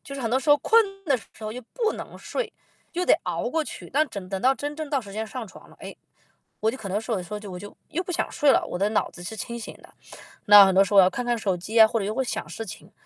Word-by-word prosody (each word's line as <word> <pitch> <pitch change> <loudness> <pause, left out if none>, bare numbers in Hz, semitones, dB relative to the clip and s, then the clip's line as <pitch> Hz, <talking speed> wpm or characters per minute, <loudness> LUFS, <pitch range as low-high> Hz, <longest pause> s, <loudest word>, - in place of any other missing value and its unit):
就 275 - -9
是 275 - -5
很 230 - -1
多 260 +2 +2
时 300 - -6
候 290 - +8
困 395 0 +2
的 285 -6 +2
时 210 - -15 0.2
候 215 - -4
又 250 - -7
不 450 -3 +1
能 - - -8
睡， - - -4 0.4
就 360 +1 -1
得 - - +4
熬 - - -2
过 320 - +1
去， - - -9
但 305 +2 +2
整 200 -5 -7
等 195 -1 -3
到 260 +4 +4
真 290 +2 -5
正 310 0 -5
到 285 -1 +1
时 200 -2 -11
间 220 +2 -3
上 245 +2 -6
床 - - -15
了， - - -18
哎， - - -9 0.6
我 220 - +1
就 - - -6
可 205 -6 -7
能 200 +3 0
说， 225 +1 -3
有 - - 0
的 - - -6
时 175 - -14
候， 210 -2 -7
我 180 - -6
就 205 +2 -10
又 355 - -2
不 360 - -5
想 345 - -1
睡 290 - +2
了， - - +2
我 180 - -5
的 200 +2 +2
脑 215 - 0
子 175 - -12
是 180 +5 -6
清 235 +2 -5
醒 225 - -7
的。 - - -18 0.5
那 205 -1 +10
很 190 - +2
多 190 +1 +6
时 195 - -6
候 205 - +4
我 - - +11
要 - - +5
看 245 +7 -4
看 240 -1 0
手 200 -4 0
机 210 +6 -1
啊， 220 - +11
或 230 +1 -1
者 200 - -2
又 210 +2 -3
会 265 - +1
想 250 - -4
事 225 - -6
情。 185 - -10
225 Hz, 345 characters per minute, -25 LUFS, 200-285 Hz, 0.6 s, 我